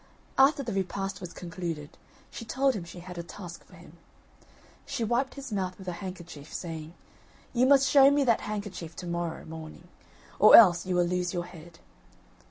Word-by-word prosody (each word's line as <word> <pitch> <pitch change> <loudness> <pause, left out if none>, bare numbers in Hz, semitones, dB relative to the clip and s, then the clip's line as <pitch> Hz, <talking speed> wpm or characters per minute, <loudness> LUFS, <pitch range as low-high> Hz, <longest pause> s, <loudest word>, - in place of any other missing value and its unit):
After 275 +1 +4
the 230 - -4
repast 195 0 -3
was 180 -2 -7
concluded, 170 -4 -6 0.4
she - - -7
told 265 +4 +1
him 200 -6 -5
she 175 +1 -10
had 180 0 -9
a - - -2
task 175 0 -10
for - - -18
him. 170 -1 -16 0.9
She 235 - -4
wiped 240 +4 0
his 275 -5 -7
mouth 185 -2 -2
with 190 - -12
a - - -1
handkerchief, 170 -6 -9
saying: 160 -1 -6 0.6
"You 255 +1 +3
must 275 0 +5
show 275 -1 +7
me 285 0 +2
that 235 -4 +2
handkerchief 200 -6 -6
to 180 - -7
morrow 170 -1 -4
morning, 160 +2 -10 0.5
or - - +9
else 185 -5 +7
you 185 - 0
will 175 0 +3
lose 180 +1 -2
your 175 0 -2
head." 170 -1 -13
180 Hz, 180 wpm, -28 LUFS, 170-225 Hz, 0.9 s, or